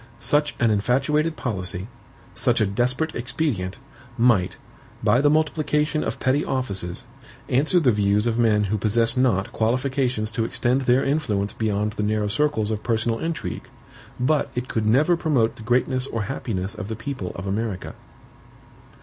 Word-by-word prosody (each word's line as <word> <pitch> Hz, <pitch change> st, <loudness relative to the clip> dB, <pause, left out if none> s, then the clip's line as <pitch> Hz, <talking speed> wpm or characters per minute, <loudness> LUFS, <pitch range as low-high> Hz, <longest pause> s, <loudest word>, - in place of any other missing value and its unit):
Such 145 Hz, +5 st, +1 dB
an 115 Hz, -2 st, +3 dB
infatuated 140 Hz, +9 st, +1 dB
policy, 95 Hz, -5 st, -3 dB, 0.5 s
such -, -, +1 dB
a 110 Hz, -, +3 dB
desperate 125 Hz, +10 st, 0 dB
expedient, 120 Hz, -7 st, -2 dB, 0.4 s
might, 110 Hz, -7 st, +3 dB, 0.5 s
by 125 Hz, -, +4 dB
the 145 Hz, -, +4 dB
multiplication 150 Hz, -1 st, +1 dB
of -, -, -3 dB
petty 135 Hz, +3 st, +1 dB
offices, 100 Hz, -9 st, -3 dB, 0.5 s
answer 150 Hz, +8 st, +3 dB
the 135 Hz, -7 st, +4 dB
views 105 Hz, 0 st, +2 dB
of 120 Hz, 0 st, 0 dB
men 110 Hz, -3 st, +3 dB
who 105 Hz, +1 st, -1 dB
possess 115 Hz, +4 st, +2 dB
not 120 Hz, -4 st, +1 dB
qualifications 125 Hz, -1 st, 0 dB
to 115 Hz, +1 st, -1 dB
extend 120 Hz, +3 st, 0 dB
their 130 Hz, +1 st, +3 dB
influence 120 Hz, -9 st, 0 dB
beyond 105 Hz, -1 st, -1 dB
the 105 Hz, -, -4 dB
narrow 105 Hz, 0 st, 0 dB
circles 110 Hz, -3 st, 0 dB
of 110 Hz, -1 st, -2 dB
personal 115 Hz, 0 st, 0 dB
intrigue, 165 Hz, 0 st, -4 dB, 0.5 s
but 145 Hz, +4 st, +1 dB
it 125 Hz, +1 st, -3 dB
could 110 Hz, -3 st, -1 dB
never 145 Hz, +10 st, +4 dB
promote 140 Hz, -9 st, +1 dB
the -, -, -12 dB
greatness 125 Hz, +3 st, +1 dB
or 115 Hz, -4 st, -3 dB
happiness 105 Hz, -5 st, -3 dB
of 105 Hz, -3 st, -6 dB
the 110 Hz, -, -4 dB
people 115 Hz, -5 st, -5 dB
of 90 Hz, -, -6 dB
America. 100 Hz, -1 st, -3 dB
120 Hz, 155 wpm, -23 LUFS, 105-135 Hz, 0.5 s, by